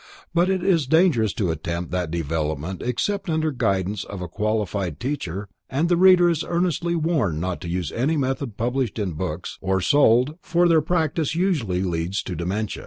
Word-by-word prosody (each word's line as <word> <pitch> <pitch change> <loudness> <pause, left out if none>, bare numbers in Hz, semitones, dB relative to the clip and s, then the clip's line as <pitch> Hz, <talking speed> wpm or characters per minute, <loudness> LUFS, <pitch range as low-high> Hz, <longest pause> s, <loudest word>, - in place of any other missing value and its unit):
But 175 +2 +3
it 190 -2 0
is 170 -7 +2
dangerous 150 - +3
to 100 -8 0
attempt 85 +2 -4
that 90 -2 -1
development 80 +1 -3
except 145 - -2
under 160 -1 +1
guidance 100 -5 -1
of 100 - -8
a 90 - -4
qualified 100 -4 -2
teacher, 100 - -3 0.2
and 155 +6 0
the 175 - +4
reader 180 0 +6
is 165 -2 +1
earnestly 170 -1 0
warned 150 - 0
not 90 +1 -3
to 85 - -5
use 85 -2 -2
any 145 +7 0
method 130 -4 -2
published 120 -1 -1
in 100 -4 -1
books, 85 +1 -5
or 95 0 +1
sold, 135 - +3
for 175 0 +2
their 165 -2 +4
practice 160 -1 0
usually 145 - 0
leads 90 +2 -2
to 90 - -5
dementia. 95 +6 -3
115 Hz, 175 wpm, -23 LUFS, -, 0.2 s, reader